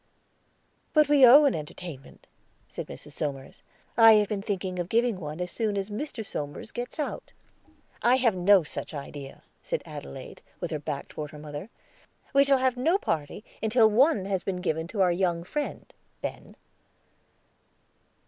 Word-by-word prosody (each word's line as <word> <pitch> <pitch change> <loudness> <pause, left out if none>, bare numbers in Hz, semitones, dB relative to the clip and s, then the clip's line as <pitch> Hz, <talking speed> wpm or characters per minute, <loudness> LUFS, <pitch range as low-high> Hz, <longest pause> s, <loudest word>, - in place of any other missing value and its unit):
"But 305 -2 +4
we 290 -2 +5
owe 285 +5 +9
an 280 - +3
entertainment," 150 -2 -8 0.4
said - - -7
Mrs. 110 - -10
Somers. 140 -3 -5 0.3
"I 225 -1 +8
have 210 -1 +4
been 205 -2 -2
thinking 190 -3 -3
of 175 0 -3
giving 230 -3 +1
one 155 -1 -6
as 180 0 -3
soon 215 -3 -1
as 195 +1 -3
Mr. 225 0 -5
Somers 145 +5 -5
gets 245 0 -6
out." 300 - -4 0.7
"I 245 +2 +5
have 245 -4 +3
no 185 +1 +5
such 155 - -6
idea," 140 -1 -8 0.2
said - - -3
Adelaide, 70 0 -9 0.2
with - - -4
her 155 - -2
back 145 -1 -5
toward 150 -1 -6
her 150 - -11
mother. 150 +6 -8 0.6
"We 275 0 +6
shall 275 -1 +4
have 260 -1 +1
no 325 +9 +3
party 160 - -3 0.2
until 220 0 +4
some 210 - -3
one 265 - +4
has 195 -2 -1
been 185 -2 -3
given 160 -2 -1
to 200 +2 -2
our 180 -2 +4
young 175 -1 0
friend, 295 +11 -5 0.3
Ben." - - -7
195 Hz, 165 wpm, -27 LUFS, 155-240 Hz, 0.7 s, owe